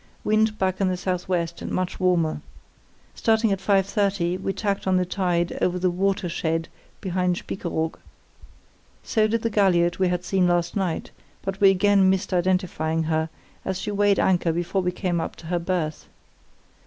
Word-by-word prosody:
Wind 215 0 +2
back 190 -1 -1
in 195 - +3
the 185 -1 0
SW 180 0 -3 0.3
and - - -5
much 185 -1 -2
warmer. 175 -4 +1 0.7
Starting 220 -1 +2
at 195 - 0
5.30 195 -2 +1
we 195 - -1
tacked 200 -1 -2
on 185 -1 +3
the 180 - +1
tide 175 -2 0
over 180 0 +1
the 180 0 +1
'watershed' 175 -3 -1 0.3
behind 180 -1 0
Spiekeroog. 165 -3 -3 1.0
So 215 -1 +2
did 225 +1 -1
the 230 - 0
galliot 180 -4 +3
we 185 - +3
had 180 0 -1
seen 185 0 +2
last 175 0 +1
night, 190 -5 -2 0.3
but 195 0 -4
we 195 - +8
again 195 0 +4
missed 190 0 0
identifying 175 -3 0
her, 160 0 0 0.3
as 190 - -2
she 210 - -3
weighed 205 0 +3
anchor 175 -3 +2
before 175 +4 -1
we 180 0 0
came 180 -2 -1
up - - -5
to - - -14
her 175 +1 -1
berth. 170 -3 -2
185 Hz, 165 wpm, -24 LUFS, 175-195 Hz, 1.0 s, we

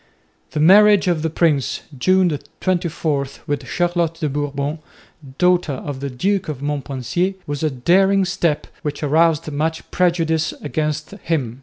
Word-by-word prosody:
The 155 - -1
marriage 200 +4 +6
of 170 -3 +1
the 160 - 0
prince 155 -4 +1
(June 180 +2 +2 0.2
24) 165 -6 -1 0.2
with 145 -1 -3
Charlotte 175 -2 0
de 155 -2 -2
Bourbon, 145 +1 -3 0.6
daughter 180 -4 +2
of 135 +1 -6
the 140 0 -4
Duke 185 +9 -1
of 145 -4 -4
Montpensier, 145 +5 -2
was 145 -1 -4
a 155 - +1
daring 190 +9 +3
step 170 -4 0 0.2
which 150 -1 -4
aroused 160 +1 +2
much 160 +3 -3
prejudice 165 -3 +1
against 150 0 -3
him. 135 -7 -2
155 Hz, 140 wpm, -20 LUFS, 145-175 Hz, 0.6 s, marriage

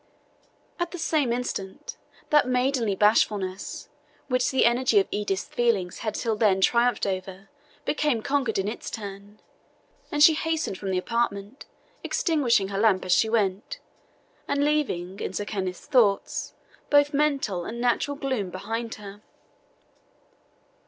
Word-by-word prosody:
At 345 0 -1
the 355 - -7
same 305 -6 +1
instant, 220 -6 -4 0.4
that 295 -3 +5
maidenly 250 -4 +1
bashfulness, 200 -2 +1 0.4
which 255 -1 +2
the 265 - +3
energy 240 -2 +4
of 195 - 0
Edith's 205 -2 -1
feelings 210 -7 -1
had 215 -2 -3
till 225 -2 -1
then 210 -3 +3
triumphed 240 +5 +2
over, 190 0 -5 0.3
became 295 -7 0
conqueror 270 -5 0
in 195 +1 -1
its 215 - -5
turn, 205 -1 -8 0.7
and 295 0 +3
she 320 - +8
hastened 320 - -2
from 195 - -4
the 185 - 0
apartment, 210 +2 -2 0.4
extinguishing 245 - +1
her 195 0 -3
lamp 205 -4 +3
as 185 - -2
she 220 +5 +4
went, 210 - -1 0.7
and 285 0 +1
leaving, 200 -12 -1
in - - -4
Sir 205 - -3
Kenneth's 190 -4 -4
thoughts, 220 -7 +1 0.3
both 290 0 +4
mental 275 -11 0
and 235 +5 -6
natural 245 +4 0
gloom 260 -9 -2
behind 225 +5 -4
her. 205 -1 -11
225 Hz, 140 wpm, -26 LUFS, 195-265 Hz, 0.7 s, she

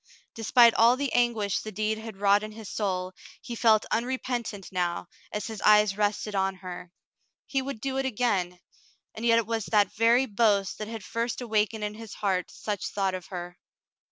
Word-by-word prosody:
Despite 230 +1 +5
all 235 +3 +5
the 280 -1 -2
anguish 225 -5 +1
the 215 - -7
deed 215 +2 -1
had 220 -3 -8
wrought 200 +1 +4
in 215 0 -7
his 220 -1 -9
soul, 185 -3 -2 0.3
he 240 - -7
felt 220 -2 +4
unrepentant 240 -4 -2
now, 175 -2 -1 0.3
as 210 - -3
his 220 -2 -6
eyes 210 -1 +5
rested 210 0 -1
on 195 -1 0
her. 180 -1 -9 0.5
He 270 - -1
would 270 -3 -5
do 265 +2 -3
it 270 - 0
again, 200 -7 0 0.5
and 225 +2 -3
yet 230 0 +5
it 230 - +1
was 225 -1 -2
that 210 -2 +2
very 230 +4 +4
boast 205 -4 +1
that 215 - -4
had 225 -2 -7
first 230 +4 -3
awakened 220 -2 0
in 210 0 -2
his 220 -1 -9
heart 190 -3 -1
such 210 -2 -4
thought 195 -2 -1
of 185 -1 -6
her. 175 -1 -7
215 Hz, 185 wpm, -27 LUFS, 195-230 Hz, 0.5 s, Despite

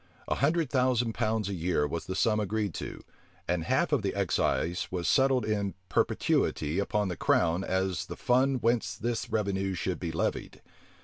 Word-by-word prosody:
A - - +1
hundred 155 +1 +1
thousand 125 -3 +2
pounds 110 -2 0
a 100 - -3
year 85 -4 0
was 80 +3 -5
the 95 - -3
sum 110 +2 +2
agreed 105 -2 -1
to; - - -6 0.4
and 85 -1 0
half - - +1
of - - +2
the - - -2
excise 85 +2 0
was 90 -2 -2
settled 135 -1 +3
in 100 -3 -1
perpetuity 80 0 +1
upon 105 0 0
the 90 - -3
crown 85 +2 +2
as 95 -2 -1
the - - -7
fund 130 +1 +2
whence 115 -6 +1
this 115 +3 -3
revenue 95 -3 -1
should 90 +1 -2
be 85 -2 -3
levied. 80 - -3
100 Hz, 175 wpm, -29 LUFS, 90-115 Hz, 0.4 s, settled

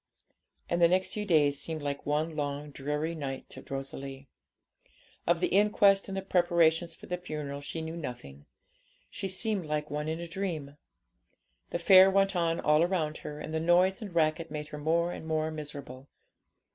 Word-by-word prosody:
And 170 0 0
the 170 - +8
next 185 +2 +1
few 210 -1 -3
days 145 -6 +3
seemed 160 0 -4
like 140 -1 -4
one 155 +2 0
long 145 0 -3
dreary 150 +4 -2
night 140 -4 -5
to - - -10
Rosalie. 135 0 -5 1.0
Of 170 0 +2
the - - +2
inquest 200 0 +4
and 195 -1 -4
the 195 - -3
preparations 170 -2 +2
for - - -13
the 180 0 -3
funeral 150 -5 -5
she 160 +3 -5
knew 160 +1 -5
nothing. 75 - -8 0.6
She 195 - -4
seemed 190 -2 -1
like 150 -1 -2
one 150 +1 -2
in 160 +1 -2
a 170 - -5
dream. 165 -6 -4 0.9
The - - -1
fair 185 +2 +8
went 195 0 +2
on 165 -1 +1
all 150 +1 +4
around 165 -3 0
her, 150 0 -7
and 155 - -6
the 160 - 0
noise 180 +5 +3
and 200 -5 -7
racket 160 0 +1
made 150 0 -5
her 150 - -7
more 170 +3 +1
and 160 - -7
more 155 0 0
miserable. 140 -4 -8
160 Hz, 180 wpm, -30 LUFS, 150-175 Hz, 1.0 s, the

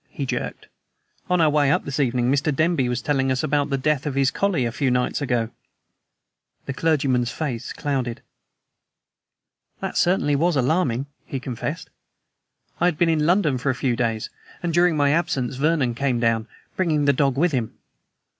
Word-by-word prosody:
he 140 - -4
jerked. - - -4 0.6
"On 180 0 +2
our 160 -2 +5
way 145 -2 +3
up - - +1
this 140 +1 -3
evening 125 -2 +1
Mr. 145 +2 +1
Denby 155 -3 +1
was 120 -1 -2
telling 135 -2 +1
us 130 - 0
about 145 0 +1
the 135 - 0
death 150 +1 0
of 140 - -3
his 135 -1 +2
collie 185 -11 0
a 115 - -1
few 135 +2 0
nights 125 +3 0
ago." 120 -5 0 1.2
The 140 - -3
clergyman's 135 -6 +1
face 130 -8 -4
clouded. 130 -5 -3 1.6
"That, - - -4
certainly, 175 -5 +2
was 170 +3 +2
alarming," 135 -2 +1 0.2
he 135 - -5
confessed. 125 -3 -5 0.9
"I 175 - +2
had 175 -4 +2
been 170 +1 +3
in 155 -2 +2
London 165 -8 +2
for 140 - -1
a 130 - +1
few 130 -2 0
days, 115 -2 -2 0.3
and 170 -1 -1
during 175 -1 +3
my 145 -1 +3
absence 140 -6 0
Vernon 145 -4 +1
came 125 0 0
down, 115 -1 +1 0.3
bringing 155 -6 +1
the 140 - +4
dog 135 -1 +1
with 170 +3 +3
him. 120 -5 -2
140 Hz, 175 wpm, -23 LUFS, 125-155 Hz, 1.6 s, our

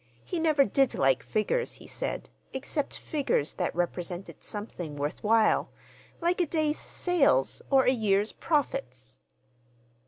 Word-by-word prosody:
He 355 - -2
never 305 -4 +4
did 270 +5 +2
like 135 -1 +3
figures, 470 - -1
he - - -12
said, - - -4 0.3
except 275 +2 -3
figures 275 - -1
that - - -2
represented 175 +1 -3
something 180 -7 -5
worth 145 +1 -3
while, 220 0 +3 0.5
like 350 +1 +1
a 345 - +1
day's 310 -1 0
sales 290 - +2
or 270 -1 +5
a 255 - +4
year's 210 -4 +2
profits. 130 - -2
230 Hz, 130 wpm, -28 LUFS, -, 0.5 s, or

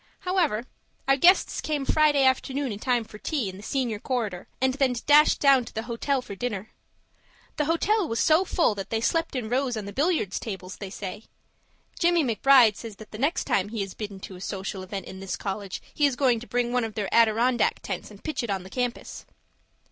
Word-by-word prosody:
However 345 - 0 0.4
our 270 - +5
guests 350 +7 +4
came 295 -3 -2
Friday 300 -2 +4
afternoon 265 0 +1
in 205 - -6
time 245 -1 +1
for 215 -1 -13
tea 265 -9 -2
in 185 - -9
the - - -10
senior 235 -2 -2
corridor, 215 -8 -3
and 260 0 +2
then 265 -2 +1
dashed 295 +1 +6
down 275 -3 +5
to - - -11
the 220 - -2
hotel 250 +3 -1
for 225 - -8
dinner. 210 -1 -4 0.9
The 300 - +1
hotel 365 +5 +1
was 230 - -2
so 315 +4 +4
full 340 - +2
that 195 -2 -6
they 225 - 0
slept 330 +6 0
in 245 -4 -2
rows 250 0 0
on 210 - -4
the 200 - -7
billiard 300 - +1
tables, 190 -3 -5
they 195 - -7
say. 200 +2 -7 0.7
Jimmie 345 -1 +3
McBride 240 -2 +5
says 225 -3 -8
that 215 +2 -13
the 215 - -8
next 285 +6 +1
time 195 +1 0
he 220 -2 -2
is 195 - -8
bidden 205 -3 -7
to 190 - -8
a 180 - -11
social 195 0 -4
event 195 0 -6
in 190 - -9
this 195 -1 -4
college, 195 -1 -5
he 295 - +3
is 275 - -2
going 250 -3 +2
to 240 - -11
bring 245 0 -1
one 250 -1 +2
of 225 -2 -5
their 205 -3 -3
Adirondack 230 +2 +3
tents - - -5
and - - -15
pitch 310 -4 -2
it 235 - -5
on 195 -2 -2
the 190 - -12
campus. 245 0 -4
240 Hz, 215 wpm, -26 LUFS, 205-275 Hz, 0.9 s, dashed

